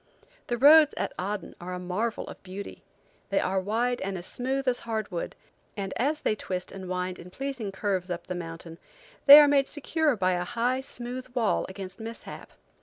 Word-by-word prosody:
The 240 Hz, -, -1 dB
roads 300 Hz, +4 st, +7 dB
at -, -, -2 dB
Aden 200 Hz, 0 st, -4 dB
are 180 Hz, +1 st, -5 dB
a -, -, -5 dB
marvel 190 Hz, +6 st, -2 dB
of -, -, -10 dB
beauty. 190 Hz, +2 st, -8 dB, 0.5 s
They -, -, +2 dB
are 190 Hz, +1 st, 0 dB
wide 230 Hz, +6 st, 0 dB
and 195 Hz, 0 st, -3 dB
as 175 Hz, -, -5 dB
smooth 265 Hz, +4 st, -2 dB
as 250 Hz, -1 st, +2 dB
hardwood, 215 Hz, -6 st, -4 dB, 0.4 s
and 195 Hz, -1 st, -3 dB
as 295 Hz, +5 st, 0 dB
they -, -, +1 dB
twist 185 Hz, -3 st, -5 dB
and 190 Hz, -2 st, -8 dB
wind 180 Hz, 0 st, -3 dB
in 175 Hz, -, -10 dB
pleasing 260 Hz, -2 st, -4 dB
curves 195 Hz, -2 st, -2 dB
up 175 Hz, 0 st, -4 dB
the 185 Hz, -, -4 dB
mountain, 165 Hz, -1 st, -7 dB, 0.5 s
they 285 Hz, +2 st, +13 dB
are 295 Hz, -, +7 dB
made 280 Hz, -1 st, +3 dB
secure 305 Hz, -1 st, 0 dB
by 185 Hz, -3 st, +1 dB
a 180 Hz, -1 st, 0 dB
high, 240 Hz, +7 st, 0 dB
smooth 250 Hz, 0 st, -6 dB
wall 230 Hz, -4 st, +1 dB
against 190 Hz, +1 st, -8 dB
mishap. 225 Hz, +1 st, -8 dB
205 Hz, 185 wpm, -27 LUFS, 185-255 Hz, 0.5 s, they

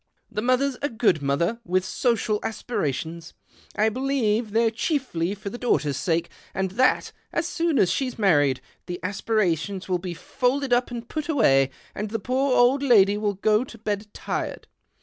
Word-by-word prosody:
The 210 Hz, -, -2 dB
mother's 255 Hz, +2 st, +1 dB
a 290 Hz, -, 0 dB
good 220 Hz, -, +2 dB
mother, 165 Hz, +11 st, 0 dB
with 185 Hz, 0 st, 0 dB
social 225 Hz, -3 st, 0 dB
aspirations 165 Hz, -, -3 dB, 0.2 s
— -, -, -26 dB
I 215 Hz, +1 st, +3 dB
believe 240 Hz, -3 st, 0 dB
they're 225 Hz, +2 st, +2 dB
chiefly 220 Hz, -, -1 dB
for 200 Hz, 0 st, -7 dB
the 240 Hz, -, -7 dB
daughter's 150 Hz, -, +1 dB
sake, 165 Hz, +4 st, -1 dB, 0.2 s
and 190 Hz, -1 st, -1 dB
that, 255 Hz, +6 st, +2 dB, 0.2 s
as 335 Hz, 0 st, -1 dB
soon 335 Hz, -3 st, 0 dB
as 185 Hz, -, +4 dB
she's 260 Hz, -3 st, -2 dB
married, 145 Hz, -, +3 dB, 0.3 s
the 175 Hz, -1 st, -4 dB
aspirations 195 Hz, -2 st, -1 dB
will 180 Hz, -2 st, 0 dB
be 175 Hz, -1 st, -5 dB
folded 260 Hz, +7 st, 0 dB
up 245 Hz, +1 st, +2 dB
and 235 Hz, -1 st, -6 dB
put 310 Hz, +2 st, -4 dB
away, 135 Hz, -, +4 dB, 0.2 s
and 210 Hz, +1 st, -4 dB
the 225 Hz, -, -1 dB
poor 260 Hz, +4 st, 0 dB
old 255 Hz, +3 st, +4 dB
lady 205 Hz, -7 st, +5 dB
w^ill 205 Hz, -2 st, -2 dB
go 215 Hz, +2 st, +3 dB
to 245 Hz, -3 st, -11 dB
bed 210 Hz, -1 st, -3 dB
tired. -, -, -4 dB
215 Hz, 170 wpm, -25 LUFS, 185-250 Hz, 0.3 s, lady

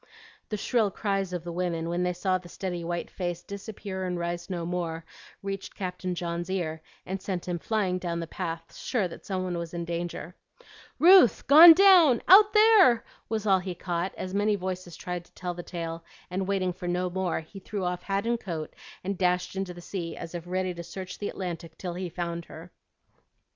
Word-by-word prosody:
The 215 Hz, -, -2 dB
shrill 220 Hz, 0 st, +1 dB
cries 195 Hz, -1 st, -1 dB
of 175 Hz, -2 st, -4 dB
the 175 Hz, -, -5 dB
women 170 Hz, -2 st, -2 dB
when 175 Hz, +1 st, -1 dB
they 180 Hz, 0 st, +1 dB
saw 185 Hz, +1 st, 0 dB
the 175 Hz, -1 st, -14 dB
steady 175 Hz, -2 st, -4 dB
white 175 Hz, 0 st, -3 dB
face 175 Hz, -1 st, -4 dB
disappear 200 Hz, -1 st, -6 dB
and 180 Hz, -1 st, -2 dB
rise 175 Hz, +1 st, -3 dB
no 175 Hz, -3 st, -3 dB
more, 165 Hz, -2 st, -3 dB, 0.4 s
reached 195 Hz, -1 st, -5 dB
Captain 180 Hz, -1 st, -4 dB
John's 170 Hz, 0 st, -3 dB
ear, 160 Hz, -4 st, -2 dB, 0.2 s
and 190 Hz, +1 st, -4 dB
sent 185 Hz, -2 st, -4 dB
him 175 Hz, -1 st, -2 dB
flying 190 Hz, -2 st, 0 dB
down 170 Hz, -2 st, -3 dB
the 165 Hz, -, -3 dB
path, 165 Hz, -1 st, -6 dB
sure 215 Hz, -8 st, -1 dB
that 170 Hz, -, -12 dB
some 190 Hz, -2 st, -1 dB
one 180 Hz, -2 st, -2 dB
was 170 Hz, 0 st, -6 dB
in 170 Hz, 0 st, -3 dB
danger. 170 Hz, 0 st, -4 dB, 0.6 s
"Ruth 355 Hz, -, +7 dB
gone 325 Hz, +4 st, +11 dB
down 345 Hz, -, +6 dB
out 415 Hz, +3 st, +9 dB
there!" 425 Hz, -, +6 dB, 0.3 s
was 220 Hz, -2 st, -2 dB
all 195 Hz, -2 st, +4 dB
he 180 Hz, -1 st, -5 dB
caught, 175 Hz, +1 st, -3 dB
as 185 Hz, 0 st, -5 dB
many 205 Hz, +1 st, +2 dB
voices 185 Hz, -3 st, -5 dB
tried 180 Hz, -1 st, -4 dB
to -, -, -25 dB
tell 180 Hz, -1 st, -4 dB
the 175 Hz, -, -6 dB
tale; 165 Hz, -1 st, -5 dB, 0.3 s
and 190 Hz, +1 st, -2 dB
waiting 190 Hz, -2 st, 0 dB
for 180 Hz, 0 st, -7 dB
no 180 Hz, +1 st, 0 dB
more, 185 Hz, -3 st, -1 dB
he 160 Hz, +5 st, -12 dB
threw 195 Hz, 0 st, -4 dB
off 180 Hz, 0 st, -2 dB
hat 195 Hz, +2 st, -1 dB
and 235 Hz, 0 st, +1 dB
coat, 165 Hz, -7 st, -5 dB, 0.3 s
and 195 Hz, 0 st, -3 dB
dashed 180 Hz, 0 st, +1 dB
into 190 Hz, -1 st, -3 dB
the 175 Hz, 0 st, -10 dB
sea 170 Hz, -2 st, -5 dB
as 165 Hz, 0 st, -7 dB
if 175 Hz, 0 st, -6 dB
ready 185 Hz, 0 st, -1 dB
to 170 Hz, -, -7 dB
search 185 Hz, +2 st, -8 dB
the 205 Hz, -, -2 dB
Atlantic 170 Hz, -3 st, -6 dB
till 180 Hz, -2 st, -5 dB
he 180 Hz, 0 st, -4 dB
found 170 Hz, 0 st, -4 dB
her. 165 Hz, +3 st, -11 dB
180 Hz, 205 wpm, -27 LUFS, 175-195 Hz, 0.6 s, gone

